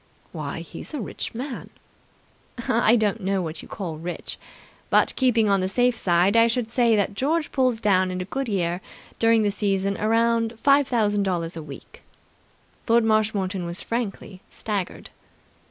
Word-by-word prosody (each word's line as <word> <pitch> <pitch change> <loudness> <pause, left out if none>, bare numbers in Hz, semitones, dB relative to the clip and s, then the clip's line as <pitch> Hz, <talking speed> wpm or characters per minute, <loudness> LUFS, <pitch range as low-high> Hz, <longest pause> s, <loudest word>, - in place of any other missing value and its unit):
"Why, - - -5
he's - - -8
a - - -3
rich 225 - -5
man!" 255 +2 -6 1.0
"I 230 0 +4
don't 220 -1 0
know 195 +1 0
what 160 -1 -5
you - - -12
call 170 -7 -6
rich, 175 +2 -6 0.5
but, - - +3
keeping 235 -4 +3
on 200 -1 +3
the 185 - 0
safe 245 +5 +2
side, 180 0 +2
I 230 0 +6
should 235 -1 -1
say 235 -3 +3
that 205 -1 0
George 300 +8 0
pulls 255 -4 +1
down 185 -4 +2
in 185 0 -3
a 180 - -3
good 270 +7 -3
year, 180 -4 -1 0.4
during 225 -1 +4
the 205 - +1
season 200 -1 0
around 230 +1 +1
five 280 +1 +4
thousand 210 -4 +1
dollars 175 -4 -1
a 165 - -5
week." 145 -3 -12 0.9
Lord 235 0 +4
Marshmoreton 210 -4 +1
was 170 0 -4
frankly 210 -5 -4
staggered. 200 -4 -4
215 Hz, 165 wpm, -24 LUFS, 190-235 Hz, 1.0 s, I